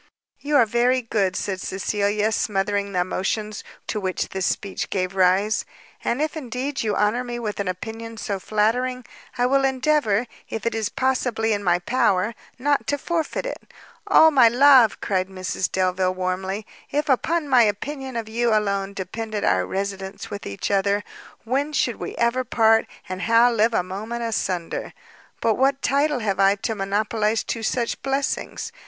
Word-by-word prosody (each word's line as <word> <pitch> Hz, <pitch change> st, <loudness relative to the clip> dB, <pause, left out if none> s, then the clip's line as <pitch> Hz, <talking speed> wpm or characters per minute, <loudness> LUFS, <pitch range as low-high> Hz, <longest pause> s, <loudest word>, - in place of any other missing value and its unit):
"You 295 Hz, +1 st, -1 dB
are 250 Hz, -5 st, +6 dB
very 245 Hz, +3 st, +2 dB
good," 200 Hz, -5 st, 0 dB
said 190 Hz, -1 st, -3 dB
Cecilia, 205 Hz, +2 st, 0 dB
smothering 200 Hz, -1 st, 0 dB
the 180 Hz, -2 st, +1 dB
emotions 210 Hz, +4 st, -2 dB, 0.2 s
to 215 Hz, -, -2 dB
which 185 Hz, -2 st, -2 dB
this 190 Hz, -1 st, -1 dB
speech 200 Hz, -1 st, -3 dB
gave 185 Hz, -1 st, -1 dB
rise, 190 Hz, +3 st, +3 dB, 0.4 s
"and 260 Hz, +6 st, 0 dB
if 310 Hz, -, -2 dB
indeed 270 Hz, 0 st, -3 dB
you 215 Hz, -2 st, 0 dB
honour 210 Hz, +4 st, +1 dB
me 240 Hz, -1 st, -5 dB
with 215 Hz, -4 st, -4 dB
an 200 Hz, -, -1 dB
opinion 225 Hz, +5 st, -5 dB
so 200 Hz, -3 st, -3 dB
flattering, 240 Hz, +5 st, 0 dB, 0.3 s
I 245 Hz, -, +2 dB
will 270 Hz, +2 st, +3 dB
endeavour, 260 Hz, -4 st, +2 dB, 0.2 s
if 225 Hz, -1 st, -5 dB
it 230 Hz, -, +1 dB
is 220 Hz, -1 st, -1 dB
possibly 245 Hz, -4 st, 0 dB
in 205 Hz, 0 st, -2 dB
my 175 Hz, -2 st, +3 dB
power, 195 Hz, +1 st, +1 dB, 0.2 s
not 285 Hz, +2 st, 0 dB
to 285 Hz, -, +1 dB
forfeit 330 Hz, -, -2 dB
it." -, -, -4 dB, 0.5 s
"Ah, 320 Hz, 0 st, +7 dB
my 260 Hz, -5 st, +7 dB
love!" 255 Hz, -1 st, +6 dB
cried 185 Hz, -2 st, 0 dB
Mrs 185 Hz, -1 st, -3 dB
Delvile 185 Hz, 0 st, +1 dB
warmly, 190 Hz, +3 st, -2 dB, 0.2 s
"if 295 Hz, +1 st, -1 dB
upon 305 Hz, +4 st, +1 dB
my 255 Hz, -3 st, +5 dB
opinion 260 Hz, +5 st, -1 dB
of 230 Hz, -2 st, -3 dB
you 235 Hz, +1 st, 0 dB
alone 200 Hz, -2 st, 0 dB
depended 210 Hz, +3 st, -4 dB
our -, -, +2 dB
residence 195 Hz, 0 st, -4 dB
with 205 Hz, -, -6 dB
each 100 Hz, -, -4 dB
other, 200 Hz, +1 st, +2 dB, 0.4 s
when 275 Hz, +6 st, -1 dB
should 245 Hz, -4 st, +1 dB
we -, -, -6 dB
ever 235 Hz, +2 st, +1 dB
part, 225 Hz, -2 st, +3 dB, 0.2 s
and 185 Hz, 0 st, -5 dB
how 230 Hz, +2 st, +5 dB
live 230 Hz, 0 st, +2 dB
a -, -, +2 dB
moment 215 Hz, +6 st, -5 dB
asunder? 185 Hz, -6 st, -2 dB, 0.5 s
But 225 Hz, -1 st, +1 dB
what 270 Hz, +1 st, +2 dB
title 280 Hz, 0 st, +1 dB
have 195 Hz, -3 st, -1 dB
I 195 Hz, +1 st, +5 dB
to 215 Hz, +3 st, -3 dB
monopolize 210 Hz, +2 st, 0 dB
two 230 Hz, -, -4 dB
such 235 Hz, +1 st, -1 dB
blessings? 275 Hz, +10 st, -2 dB
220 Hz, 170 wpm, -23 LUFS, 195-250 Hz, 0.5 s, Ah